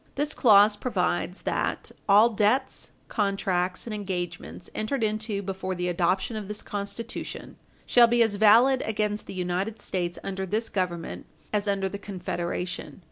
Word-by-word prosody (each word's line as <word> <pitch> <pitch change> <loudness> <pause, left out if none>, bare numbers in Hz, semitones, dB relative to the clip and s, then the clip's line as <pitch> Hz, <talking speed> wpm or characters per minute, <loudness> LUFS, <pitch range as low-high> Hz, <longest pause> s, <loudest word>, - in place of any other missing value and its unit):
This 295 +2 -1
clause 210 -3 +6
provides 180 -5 -1
that - - -2 0.2
"all 210 +4 +7
debts, 220 +6 +1 0.2
contracts, 190 -3 0
and 230 - -5
engagements 180 -3 -5
entered 225 +3 -2
into 215 -1 -1
before 190 -1 -3
the 180 0 -2
adoption 180 +5 0
of 210 -2 -5
this 210 0 -5
Constitution 210 +4 -6 0.3
shall 240 -1 +6
be 235 0 +4
as 210 -3 -1
valid 235 +5 +6
against 210 -1 -1
the - - -7
United 185 +4 -2
States 175 -2 -3
under 190 0 -3
this 220 +4 -1
Government 175 -3 -3 0.3
as 210 0 0
under 195 -1 +1
the 200 +1 -6
Confederation." 180 -3 -4
200 Hz, 145 wpm, -26 LUFS, 185-220 Hz, 0.3 s, all